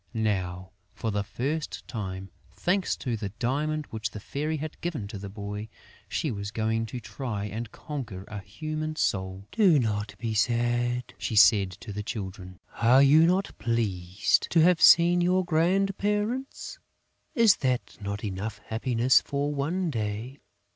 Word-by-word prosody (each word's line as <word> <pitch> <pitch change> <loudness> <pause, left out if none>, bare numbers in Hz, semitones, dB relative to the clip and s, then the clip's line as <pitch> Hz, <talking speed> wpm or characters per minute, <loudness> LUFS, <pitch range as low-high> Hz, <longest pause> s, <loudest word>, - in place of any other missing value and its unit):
Now, 95 -4 -1 0.2
for 110 - -2
the 100 0 -1
first 145 +9 -4
time, 95 -4 -5 0.2
thanks 185 +1 0
to 120 -3 -2
the 105 -2 -4
diamond 150 +5 -1
which 110 -3 -3
the 105 - -8
Fairy 150 +8 -3
had 155 +1 -7
given 155 -12 -3
to 100 -2 -6
the 100 0 -7
boy, 105 +1 -6 0.4
she 155 - -1
was 100 -2 -4
going 110 +1 -1
to 125 - -6
try 115 -3 -4
and 110 +2 -5
conquer 120 -11 -6
a 105 - -6
human 155 +10 -5
soul: 95 -5 -1
"Do 195 -8 +5
not 105 -4 -1
be 115 -1 -3
sad," 120 +2 0
she 110 - -3
said 100 -2 +6
to 105 - -7
the 105 - -3
Children. 95 -4 -6 0.2
"Are 125 +4 +6
you 155 +4 +6
not 185 +3 0
pleased 100 -6 +1
to 165 - +4
have 175 0 +4
seen 175 +1 +7
your 185 +1 +2
grandparents? 195 +8 0 0.6
Is 230 -5 +6
that 130 -2 -1
not 100 +1 -4
enough 105 +1 -4
happiness 120 +2 +3
for 145 +1 -2
one 165 +5 -1
day? 110 +3 -4
120 Hz, 155 wpm, -27 LUFS, 105-155 Hz, 0.6 s, seen